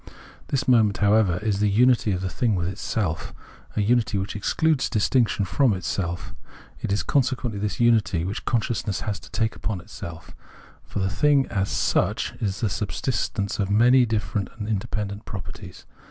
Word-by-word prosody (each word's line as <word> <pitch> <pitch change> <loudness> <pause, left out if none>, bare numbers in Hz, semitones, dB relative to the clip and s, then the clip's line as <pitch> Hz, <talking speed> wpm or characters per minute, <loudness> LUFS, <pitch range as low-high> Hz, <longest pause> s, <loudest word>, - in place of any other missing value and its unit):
This 140 0 -1
moment, 110 -5 +4
however, 105 -3 +3
is 105 -3 0
the 105 0 +3
unity 120 +1 +4
of 90 -1 -1
the 95 - -1
thing 120 -2 0
with 85 -1 -1
itself, 90 -2 -3 0.4
an 105 - +1
unity 115 -1 +2
which 95 +2 -3
excludes 155 +8 +1
distinction 110 -2 +2
from 105 +6 +2
itself. 90 -1 -3 0.5
It - - -3
is 100 - +1
conse 130 -1 +2
quently 115 -5 -4
this 105 -1 -2
unity 110 -8 +3
which 100 +3 -4
consciousness 110 -4 -1
has 105 -2 -3
to - - -14
take 110 -1 -1
upon 100 -4 -3
itself; 85 0 -9 0.5
for - - -8
the 95 -1 +1
thing 145 +2 +3
as 95 -1 -1
such - - 0
is 100 -2 -2
the 115 - +2
subsistence 100 -1 -2
of 100 -1 0
many 120 +4 +5
different 105 -3 -1
and 105 -2 -5
independent 105 0 -3
properties. 95 -2 -8
105 Hz, 170 wpm, -24 LUFS, 95-120 Hz, 0.5 s, many